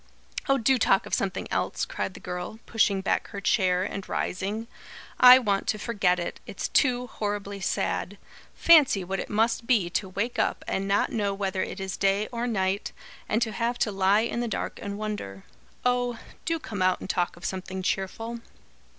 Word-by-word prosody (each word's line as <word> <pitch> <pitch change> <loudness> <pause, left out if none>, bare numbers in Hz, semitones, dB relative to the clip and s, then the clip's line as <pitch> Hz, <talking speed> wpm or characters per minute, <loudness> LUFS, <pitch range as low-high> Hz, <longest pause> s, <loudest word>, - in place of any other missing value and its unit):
"Oh, 275 - +5
do 260 +1 +3
talk 195 -3 +3
of - - -9
something 195 -1 -1
else!" - - -1
cried - - -4
the - - -9
girl, 180 +4 -5
pushing 200 -4 +2
back 190 - 0
her 200 - -6
chair 185 -3 +2
and 195 0 -5
rising. 205 +5 -2 0.5
"I 250 0 +11
want 205 -6 0
to 215 - +1
forget 200 -5 +1
it. 175 - -4
It's - - -4
too 250 -3 +2
horribly 205 -3 -4
sad. 200 +1 -1 0.4
Fancy 295 - +6
what 190 +2 -3
it - - -5
must 225 +2 +1
be 205 -9 +2
to 190 +1 -1
wake 215 +6 -2
up - - 0
and 195 +1 -1
not 200 +1 +2
know 205 -3 0
whether 195 -1 -1
it - - -4
is 190 -3 -4
day 195 +2 +2
or 240 0 -2
night, 195 -3 -1 0.4
and 220 +2 +2
to 225 - -3
have 235 +2 -1
to 215 - 0
lie 195 +2 +3
in 235 +1 -2
the 240 - -1
dark - - -4
and 200 0 -4
wonder. 205 - -5 0.4
Oh, 245 -1 +1 0.3
do 330 +1 +1
come 210 -11 -6
out 185 0 +3
and - - -7
talk 175 -2 -1
of 175 - -10
something 190 0 -4
cheerful." 225 +6 -2
205 Hz, 190 wpm, -27 LUFS, 190-235 Hz, 0.5 s, I